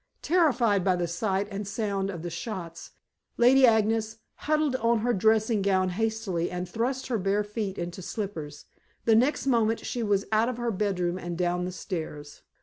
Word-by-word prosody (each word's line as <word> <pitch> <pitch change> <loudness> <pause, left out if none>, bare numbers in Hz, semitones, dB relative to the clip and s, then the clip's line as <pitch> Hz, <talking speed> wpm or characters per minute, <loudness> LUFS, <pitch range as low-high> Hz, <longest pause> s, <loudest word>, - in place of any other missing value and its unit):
Terrified 250 - +3
by 185 -1 +3
the 175 -1 -1
sight 190 +3 -1
and 200 +1 -4
the 200 - -7
sound 200 -2 -2
of 170 -4 -6
the 175 - -4
shots, 170 -2 -6 0.5
Lady 255 +2 +6
Agnes 220 0 +2 0.2
huddled 305 -3 0
on 230 -1 +2
her 240 +2 +1
dressing 220 +1 +2
gown 190 -1 +2
hastily, 210 -3 -1
and 180 0 -4
thrust 245 +7 -2
her 240 -4 -1
bare 195 +2 +1
feet 205 -2 -4
into 175 +2 -5
slippers. 175 -7 -6 0.4
The 225 - +5
next 255 +8 +2
moment 230 -4 +1
she 245 - -3
was 205 -2 +1
out 220 +2 +3
of 250 - -4
her 240 -1 -1
bedroom 185 -3 -1
and 175 -1 -5
down 180 0 0
the 180 - -3
stairs. 160 -6 -6
205 Hz, 180 wpm, -27 LUFS, 180-230 Hz, 0.5 s, Lady